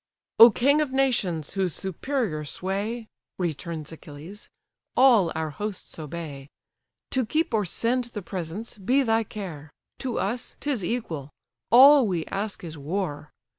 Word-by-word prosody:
"O 230 - +12
king 280 +7 +3
of 295 -3 -1
nations! 230 - +1
whose 190 -4 0
superior 190 - -2
sway 200 +9 -3 0.3
(Returns 165 -2 -4
Achilles) 160 +5 -10 0.5
all 235 -10 +6
our 160 -1 -2
hosts 205 +1 -6
obey! 150 -3 -7 0.6
To 260 - +1
keep 310 +5 0
or 210 -2 +2
send 240 +8 0
the 225 -4 -7
presents, 190 +6 -5
be 255 +8 +2
thy 225 -2 +2
care; 175 -9 -7 0.3
To 255 -3 -3
us, 235 +5 -3
'tis 275 -9 -1
equal: 170 - -3 0.4
all 270 +1 +8
we 175 -5 -1
ask 200 +1 -4
is 160 -3 -7
war. 150 -1 -3
200 Hz, 135 wpm, -26 LUFS, 160-240 Hz, 0.6 s, O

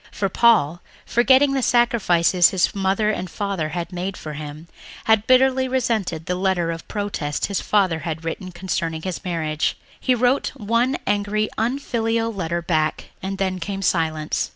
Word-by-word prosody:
For 195 - -1
Paul, 185 -7 +3 0.2
forgetting 265 +3 +4
the 270 - +1
sacrifices 190 -8 +3
his 185 -2 +1
mother 200 +2 +1
and 185 -3 -4
father 195 -6 -2
had 175 +2 -5
made 185 +2 -4
for 155 - -7
him, 150 +2 -8 0.4
had 220 -1 +3
bitterly 260 0 +4
resented 225 -11 -1
the 180 - -1
letter 180 -2 0
of 165 0 -7
protest 200 -8 -2
his 200 - -2
father 190 -6 +2
had 160 +1 -5
written 185 +3 -4
concerning 170 -3 -3
his 185 -2 -4
marriage. 155 -4 -1 0.2
He 255 - +2
wrote 245 +3 +1
one 235 +2 +1
angry, 205 +1 0
unfilial 230 -2 -1
letter 170 -3 -2
back 155 -3 -1
and 195 +1 -4
then 190 -1 -1
came 195 +2 -4
silence. 160 -4 0
190 Hz, 155 wpm, -22 LUFS, 170-225 Hz, 0.4 s, forgetting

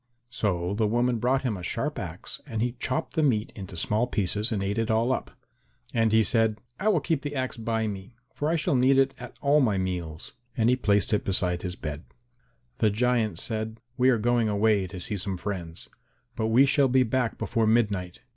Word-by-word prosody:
So 95 -6 -1
the 110 +1 +1
woman 120 +2 +1
brought 130 +4 +1
him 120 -5 -1
a 90 - -7
sharp 85 - -2
axe - - -6
and 110 0 -2
he 125 - 0
chopped 130 - -2
the 160 - +1
meat 115 -8 +1
into 95 -4 -8
small 110 +8 +1
pieces 105 0 0
and 100 -3 -1
ate 100 +3 -1
it 115 0 -1
all 115 +3 +2
up. - - -3 0.6
And 115 -1 +2
he 110 0 +5
said, 110 -1 +2 0.2
"I 205 - -1
will 190 -8 +3
keep 160 -5 0
the 145 0 -5
axe 130 -1 -2
by 115 -1 -1
me, 100 +2 -6 0.2
for 150 - -1
I 165 - +2
shall 150 - 0
need 130 +2 +4
it 135 0 +3
at 125 0 -10
all 145 +1 +4
my 110 -8 +2
meals," 90 -4 -4 0.2
and 115 +1 +3
he - - +4
placed 105 -4 +1
it 105 - +1
beside 90 -2 0
his 90 -1 -4
bed. 75 -1 -6 0.7
The 110 - +4
giant 110 -3 +1
said, 110 +2 -3 0.2
"We 130 +1 +4
are 125 - +4
going 120 0 +1
away 105 -2 +2
to 90 0 -8
see 100 +3 -2
some 95 0 -2
friends, 90 -4 -6 0.5
but 110 -2 -1
we 120 +5 +5
shall 140 0 +3
be 130 0 +4
back 125 0 -1
before 115 -2 0
midnight." 105 -6 +1
110 Hz, 210 wpm, -27 LUFS, 100-125 Hz, 0.7 s, he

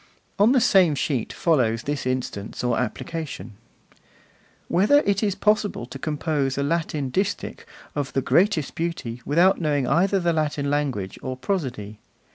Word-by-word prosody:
On 210 +4 +6
the 265 - +5
same 190 -10 +4
sheet 135 -4 -1
follows 120 -9 +1
this 145 -2 -3
instance 125 -5 -3
or 125 -1 +1
application: 130 - -5 1.1
Whether 210 +12 +4
it 200 -5 0
is 205 -3 0
possible 210 - +1
to 135 +2 -9
compose 150 -3 -1
a 140 - 0
Latin 150 -3 -1
distich 195 +7 -2 0.3
of 145 -2 -3
the 135 - +1
greatest 180 -5 +2
beauty 160 -8 -4
without 175 +6 +4
knowing 145 -4 +1
either 185 +9 +2
the 175 -2 +1
Latin 150 -2 -1
language 135 -10 -2
or 130 -1 -4
prosody. 125 - -3
150 Hz, 145 wpm, -24 LUFS, 130-180 Hz, 1.1 s, On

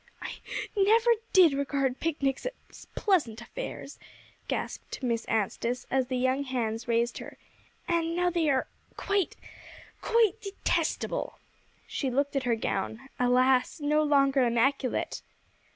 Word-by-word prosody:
"I - - -5 0.4
never 440 +4 +4 0.2
did 360 -6 +7
regard 275 -2 -1
picnics 285 - -1 0.2
as - - -14
pleasant 305 - +1
affairs," - - -7 0.5
gasped - - -4
Miss 235 -2 0
Anstice, 230 +3 -1
as 260 -1 +2
the 255 0 -1
young 260 +2 +1
hands 240 -3 -2
raised 235 0 +1
her, - - -10 0.5
"and 335 -1 0
now 355 0 +2
they 330 -3 +1
are 265 -2 +2 0.3
quite 400 -3 0 0.7
quite 450 -2 +2
detestable." 400 -2 -2 0.5
She 270 - -2
looked 280 +3 0
at 270 -1 0
her 230 - +3
gown, 220 +4 -3
alas! 250 +3 +3
no 300 +1 +2
longer 275 -2 +3
immaculate. 250 +2 0
275 Hz, 125 wpm, -28 LUFS, 250-330 Hz, 0.7 s, did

